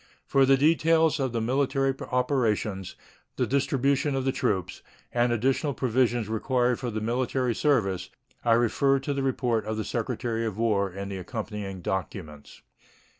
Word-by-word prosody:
For 135 -1 +3
the 135 0 +5
details 160 +1 +3
of 130 -2 0
the 115 -1 -1
military 135 +2 +1 0.2
operations, 110 -7 0 0.4
the - - +1
distribution 140 +1 +1
of 135 -1 -1
the 135 - +2
troops, 105 - -2 0.3
and 120 0 +2
additional 130 +4 0
provisions 120 -2 +1
required 125 +2 0
for 125 - -3
the 110 -1 -3
military 125 +2 0
service, 110 - +1 0.3
I 115 - +4
refer 120 +4 +3
to 135 +1 -3
the 140 - -2
report 125 -4 0
of 110 0 -2
the 110 - -2
Secretary 115 -1 -2
of 110 -3 -3
War 105 -4 +1
and 100 +2 -6
the 95 - -4
accompanying 105 -2 -5
documents. 85 -6 -5
120 Hz, 155 wpm, -27 LUFS, 110-135 Hz, 0.4 s, the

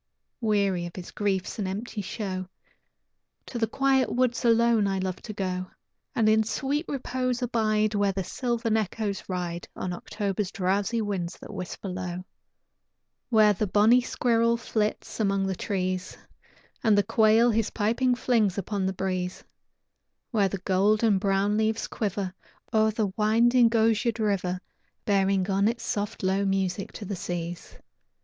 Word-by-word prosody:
Weary 200 -5 +1
of 170 - -11
his 180 -2 -8
griefs 200 +1 -2
and 200 - -1
empty 210 +3 -4
show, 185 -2 -4 1.0
To 240 - -5
the 225 - +2
quiet 270 +2 +2
woods 245 -1 +1
alone 230 -2 +4
I 195 0 0
love 185 -1 -2
to 220 - -7
go, 185 -2 -3 0.5
And 225 -2 +3
in 220 0 +5
sweet 280 +8 -1
repose 255 -2 -2
abide 215 -3 +1
Where 205 -1 +2
the 190 0 -3
sylvan 235 +1 -1
echoes 210 -1 -2
ride 175 -2 -3
On 180 - -3
October's 200 +1 -3
drowsy 200 +4 0
winds 185 -4 -3
that - - -10
whisper 185 +2 -6
low. 180 -1 -5 1.0
Where 215 -3 +5
the 210 +2 -1
bonnie 215 +6 +5
squirrel 235 -1 +1
flits 215 -2 -2
among 195 -2 +1
the 190 - -1
trees, 185 -1 -2 0.7
And 215 -2 +4
the 205 - +4
quail 225 +2 +4
his 225 -1 +1
piping 240 +4 +1
flings 225 -6 +1
upon 200 0 -1
the 190 - -1
breeze, 185 -1 -3 0.9
Where 205 -5 +2
the 195 - -3
gold 205 +3 +3
and 210 -4 +4
brown 200 +1 +1
leaves 220 +1 +1
quiver 200 -3 -3 0.4
O'er 220 0 +4
the 215 -3 -1
winding, 230 +3 +4
osiered 225 0 +2
river, 190 -4 -1 0.4
Bearing 195 -2 +2
on 195 +2 +3
its 235 +1 -2
soft, 205 -1 -3
low 190 +1 +2
music 195 0 -1
to 210 - -7
the 200 - -3
seas. 175 -1 -5
205 Hz, 150 wpm, -27 LUFS, 190-225 Hz, 1.0 s, in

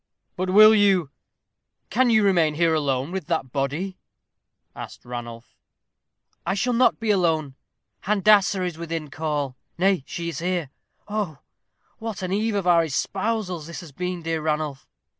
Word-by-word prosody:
"But 185 0 -2
will 215 +3 +8
you, 195 -8 +3 0.8
can 250 +4 +3
you 220 -2 +4
remain 170 -6 +3
here 165 0 +3
alone 140 -1 0
with 190 -5 -4
that 130 - -1
body?" 150 +8 -2 0.8
asked - - -9
Ranulph. 120 -1 -8 0.9
"I 190 +3 -1
shall 245 +5 0
not 245 +2 +3
be 225 -2 +1
alone. 160 -7 +1 0.5
Handassah 200 -2 +4
is 170 -2 -5
within 165 -3 -4
call 145 -4 -2 0.2
nay, 190 -4 +2
she 170 -1 -4
is 165 - -5
here. 175 -4 -2 0.4
Oh, 205 -8 -3 0.6
what 220 -4 -5
an 185 +1 -2
eve 215 +1 0
of 200 -3 -1
our 170 -2 +5
espousals 185 +2 -2
has 170 - -7
this 170 -4 -12
been, 180 +3 -4
dear 165 -1 -1
Ranulph. 150 -3 -2
175 Hz, 150 wpm, -24 LUFS, 155-200 Hz, 0.9 s, will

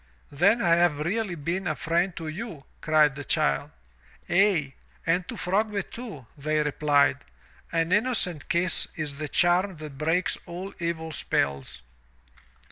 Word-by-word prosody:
"Then 200 +11 +3
I 170 -1 +4
have 170 -4 +2
really 195 +3 -1
been 170 +5 -3
a 155 - 0
friend 170 +4 0
to 165 -1 -6
you, 170 -2 -6 0.2
cried 155 -2 +4
the 145 +1 -7
child. 70 - +1 0.6
"Aye, 175 -8 +3 0.3
and 175 +2 +1
to - - -6
Frogbit, 200 +2 -1
too, 215 - -8
they 155 +1 0
replied. 145 -1 +2 0.5
"An 165 0 0
innocent 205 - +1
kiss 170 +1 +2
is 150 -3 -3
the 155 0 -4
charm 180 +4 +3
that 150 -3 -9
breaks 165 +4 +1
all 180 +3 -6
evil 165 -1 -3
spells. 70 - -2
165 Hz, 140 wpm, -26 LUFS, 150-185 Hz, 0.6 s, I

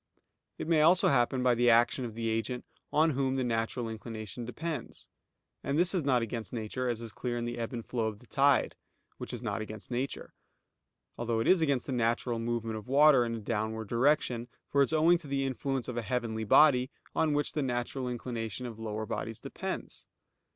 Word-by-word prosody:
It - - -5
may 165 -2 +4
also 170 +4 +5
happen 125 -1 +2
by 125 -1 +4
the 120 +1 +3
action 120 +2 +4
of 115 -2 -7
the 115 0 -2
agent 115 +3 -2 0.3
on 160 +2 +4
whom 135 -1 0
the 130 - 0
natural 115 0 -1
inclination 110 -1 -6
depends; 150 +2 -5 0.6
and 140 - -1
this 175 +3 +3
is 180 -5 0
not 130 -4 +2
against 115 -3 -4
nature, 120 +2 -3
as 115 -1 -2
is 115 -1 -6
clear 120 +1 -3
in 120 - -2
the 120 0 -4
ebb 115 - -3
and 120 -3 -5
flow 115 -3 -1
of 110 -2 -4
the 125 - -18
tide, 140 +3 +3 0.4
which - - -5
is 120 0 -5
not 110 -1 -2
against 110 +2 -8
nature; 130 +3 -3 0.9
although 115 -1 0
it 115 - 0
is 185 -2 +5
against 140 -5 +1
the - - -5
natural 120 -1 0
movement 115 -1 -2
of 105 - -9
water 140 -1 +6
in 115 -1 -2
a - - -4
downward 110 0 -3
direction; 120 -1 +2 0.2
for 140 - +4
it - - +6
is 155 - -6
owing 165 +2 +5
to 160 - -11
the 135 -1 0
influence 135 -1 -2
of 125 - -4
a - - 0
heavenly 110 -1 -2
body, 130 +1 +5 0.2
on 155 -2 +2
which 145 0 0
the 150 - 0
natural 125 0 -2
inclination 120 -1 -4
of 115 -2 -7
lower 110 -1 -3
bodies 110 +1 -4
depends. - - -6
120 Hz, 205 wpm, -30 LUFS, 115-135 Hz, 0.9 s, water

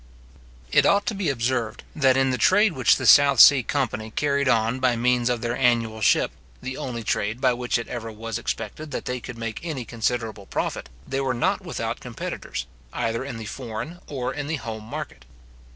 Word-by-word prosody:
It - - +5
ought 200 0 +3
to 235 - -1
be 195 -5 -1
observed, 120 -3 -1
that 135 -4 +4
in 135 0 +3
the 125 - -2
trade 205 - +4
which 130 -5 +4
the - - -4
South 140 -3 +7
Sea 140 +2 +9
company 125 -4 -2
carried 140 +2 0
on 115 +1 +2
by 125 -2 +2
means 120 +1 +2
of 120 -2 -1
their 120 0 -1
annual 115 -3 +1
ship, 100 - +3 0.3
the 130 0 -5
only 120 -4 -5
trade 110 +2 -1
by 130 -2 +3
which 120 0 -1
it 115 - -5
ever 115 -2 -5
was 115 +1 -5
expected 155 +5 -5
that 145 - -5
they 125 0 -3
could 125 0 -9
make 115 -1 -4
any 150 -8 -4
considerable 110 -3 -3
profit, - - -3 0.2
they 135 - -1
were 130 -2 0
not 120 - +1
without - - -4
competitors, - - -5 0.3
either 115 0 -2
in 135 -4 -6
the 110 - -7
foreign 125 - -6
or 130 -4 -3
in 145 -1 -4
the 160 - -1
home 110 -5 -6
market. 65 - -7
125 Hz, 200 wpm, -24 LUFS, 115-135 Hz, 0.3 s, Sea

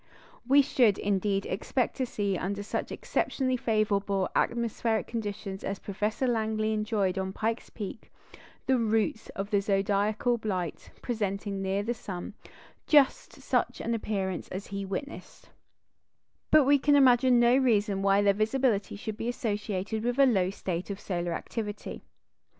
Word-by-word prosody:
We 280 +2 +6
should, 235 -6 +3
indeed, 200 0 0
expect 240 +6 -1
to 260 -2 -1
see, 200 -4 -1
under 200 +3 -3
such - - -3
exceptionally 255 -2 -1
favourable 205 -4 0
atmospheric 230 -1 0
conditions 205 -3 -5
as 195 - -3
Professor 210 +6 -2
Langley 220 -2 0
enjoyed 210 -3 0
on 190 0 -3
Pike's 225 +3 -2
Peak, 210 0 -8 0.5
the 260 -1 +3
roots 220 -1 0
of 200 +2 -4
the 200 -1 +3
zodiacal 205 +4 +1
light 185 -6 -3
presenting 200 -3 -2
near 195 +1 -1
the 235 +3 -1
sun 195 -5 -7 0.5
just 290 -3 +4
such - - -1
an 235 - -2
appearance 195 -5 -2
as 190 +2 -6
he 200 0 -5
witnessed; 235 - -7 1.0
but 310 -1 +6
we 285 +1 +4
can 290 +1 +4
imagine 255 -2 +5
no 240 +1 +5
reason 210 -7 +2
why 200 +1 +3
their 200 -1 +4
visibility 215 0 0
should 215 +1 -6
be 230 +1 -2
associated 215 -3 -2
with 245 +1 -1
a 275 - +7
low 195 -8 +2
state 185 -2 -4
of 200 0 -4
solar 175 -2 -2
activity. 210 +2 -5
210 Hz, 145 wpm, -28 LUFS, 195-235 Hz, 1.0 s, a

